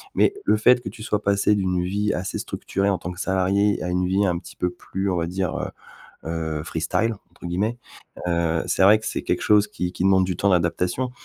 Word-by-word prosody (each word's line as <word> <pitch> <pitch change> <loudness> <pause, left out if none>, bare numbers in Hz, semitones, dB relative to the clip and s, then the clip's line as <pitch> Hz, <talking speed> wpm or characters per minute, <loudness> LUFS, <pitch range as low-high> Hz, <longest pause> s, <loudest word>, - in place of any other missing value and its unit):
Mais - - +4
le - - +3
fait 125 +3 +5
que 120 - -5
tu 110 +2 -10
sois 105 -2 -1
passée 100 +1 +2
d'une 90 -3 0
vie 100 +3 0
assez 90 +1 -3
structurée 100 +1 -2
en 95 - +1
tant 90 +1 -6
que 90 - -10
salariée 95 +2 +1
à 90 - -2
une 90 0 0
vie 95 +2 +2
un 90 -3 +1
petit - - -13
peu 90 - 0
plus 95 +2 -4
on - - 0
va 85 0 -1
dire, 90 -1 -2
heu - - -3 0.6
heu 80 -2 -3
«freestyle», 85 +8 -1 0.2
entre 85 - -13
guillemets, 100 +7 -1 0.5
heu, 85 -2 +1
c'est - - +1
vrai 105 +3 +7
que 110 - -9
c'est - - -2
quelque - - -1
chose 105 -1 +4
qui 90 0 -3
qui 90 - -4
demande 95 -1 +5
du 90 -1 -2
temps 100 - +2
d'adaptation. 90 +7 0
95 Hz, 230 wpm, -23 LUFS, 90-100 Hz, 0.6 s, vrai